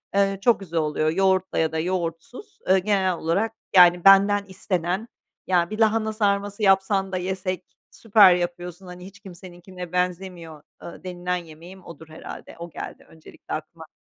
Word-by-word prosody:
Eee, 195 0 +2
çok 240 -1 +3
güzel 170 -4 -3
oluyor. 155 0 0
Yoğurtla 190 +1 +1
ya 160 -1 +1
da 160 - -2
yoğurtsuz, 180 - -5
eee, 190 0 +5
genel 190 -2 +1
olarak, 195 +8 -1 0.2
yani, 175 -1 +7
benden 200 +1 +6
istenen, 190 +2 -3 0.4
Ya, 175 -2 +2
bir 215 +1 -6
lahana 220 0 +2
sarması 205 0 -1
yapsan 195 0 +2
da 185 - -2
yesek. 185 0 -5
Süper 205 -5 +5
yapıyorsun. 175 +1 -5
Hani, 180 0 -10
hiç 200 +1 -14
kimseninkine 180 -2 -11
benzemiyor." 180 -3 -3 0.2
ııı, 170 - -10
denilen 180 0 -3
yemeğim 175 +2 -11
odur 160 -1 -12
herhâlde. 155 - -10
O 170 0 -7
geldi - - -9
öncelikle 160 -1 -12
aklıma. 160 +1 -7
185 Hz, 155 wpm, -23 LUFS, 170-195 Hz, 0.4 s, yani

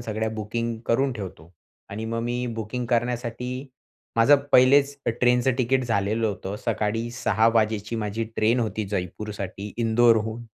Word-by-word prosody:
सगळ्या 110 -1 -2
बुकिंग 115 +2 -3
करून 135 +3 +2
ठेवतो. 95 -7 -8 0.4
आणि 105 +3 -5
मग 115 +1 -2
मी 120 +1 -2
बुकिंग 120 +3 -4
करण्यासाठी 120 0 -1 0.7
माझं 115 +6 +6 0.2
पहिलेच 140 +2 +5
अ, - - +3
ट्रेनचं 125 +2 +2
तिकीट 130 +1 +2
झालेलं 110 0 0
होतं. 100 -1 -4
सकाळी 115 +2 -1
6:00 115 -2 +2
वाजेची 110 0 +1
माझी 110 +1 -2
ट्रेन 115 +3 +3
होती 110 -2 -2
जयपूरसाठी 100 +1 -5
इंदोरहून. 115 0 +2
115 Hz, 135 wpm, -25 LUFS, 105-120 Hz, 0.7 s, माझं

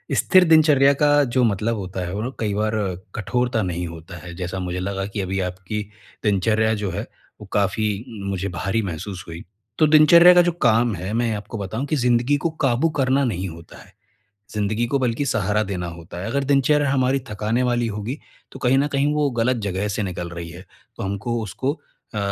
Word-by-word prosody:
स्थिर 185 -1 +5
दिनचर्या 150 -4 +5
का 145 0 +4
जो 130 -1 +3
मतलब 110 +1 +1
होता 95 -1 -5
है, 90 - -5
वो 110 +6 -3
कई 105 -2 -1
बार 105 +1 0 0.4
कठोरता 120 +2 0
नहीं 90 -2 -2
होता 80 +1 -10
है। 85 - -8
जैसा 90 +1 -4
मुझे 90 0 -3
लगा 95 +1 -3
कि 100 0 -4
अभी 95 +1 -2
आपकी 95 +4 -5 0.4
दिनचर्या 110 +2 +2
जो 95 - -1
है, 100 +6 -4 0.4
वो 105 - -8
काफ़ी 100 +1 0 0.2
उम, 100 - -5
मुझे 95 0 -2
भारी 95 +6 -1
महसूस 95 0 -5
हुई। 85 0 -8 0.4
तो 155 - +5
दिनचर्या 170 +4 +8
का 180 - +7
जो 175 0 +2
काम 115 -1 +3
है, 95 +4 -5
मैं 115 -1 +1
आपको 105 +2 -7
बताऊँ 110 +7 -3
कि 155 - -1
ज़िन्दगी 125 +2 +2
को - - +3 0.2
काबू 130 +5 +2
करना 135 +1 +2
नहीं 95 -5 -2
होता 85 +1 -12
है। - - -22 0.6
ज़िन्दगी 105 +3 0
को 140 +3 0
बल्कि 125 +2 0
सहारा 105 -2 +1
देना 95 -4 -4
होता 85 0 -9
है। - - -4
अगर 140 +4 -1
दिनचर्या 140 +1 +3
हमारी 135 0 +2
थकाने 105 +4 -1
वाली 120 -1 +1
होगी, 110 +6 -4 0.3
तो - - -9
कहीं 130 +2 +3
न 140 - +2
कहीं 145 +1 +1
वो 150 -2 +1
गलत 125 +2 +2
जगह 100 +1 -2
से 105 +1 -2
निकल 90 -3 -4
रही 85 -1 -7
है। 90 +3 -11 0.3
तो - - -6
हमको 110 +4 -2
उसको 130 - -3 0.3
अ, 105 - -2
110 Hz, 200 wpm, -22 LUFS, 95-130 Hz, 0.6 s, दिनचर्या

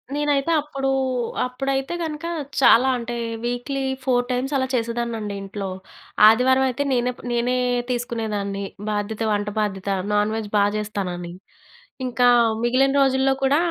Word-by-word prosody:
నేనైతే 290 +1 +1
అప్పుడూ, 275 -2 -3 0.6
అప్పుడైతే 270 +3 -2
గనక 315 0 -4 0.4
చాలా 260 0 +6
అంటే 240 0 -5 0.3
వీక్లీ 245 +3 -2 0.2
4 245 -1 +2
టైమ్స్ 255 +3 -1
అలా 260 0 0
చేసేదాన్నండి 230 -3 -2
ఇంట్లో. 195 0 -5 0.6
ఆదివారం 255 +4 +4
అయితే 255 +3 -2
నేనే 245 0 +1
ప్ - - -13
నేనే 240 +1 +1 0.3
తీసుకునేదాన్ని 215 -5 -3 0.3
బాధ్యత, 210 +1 -3
వంట 205 0 -1
బాధ్యత 200 -2 -2 0.2
నాన్ 210 +1 +2
వెజ్ 220 -2 -4
బా 200 - +5
చేస్తానని. 185 -5 -4 0.7
ఇంకా 245 0 +2 0.3
మిగిలిన 255 +3 +2
రోజుల్లో 265 0 +3
కూడా 270 +2 +3
240 Hz, 125 wpm, -22 LUFS, 210-270 Hz, 0.7 s, చాలా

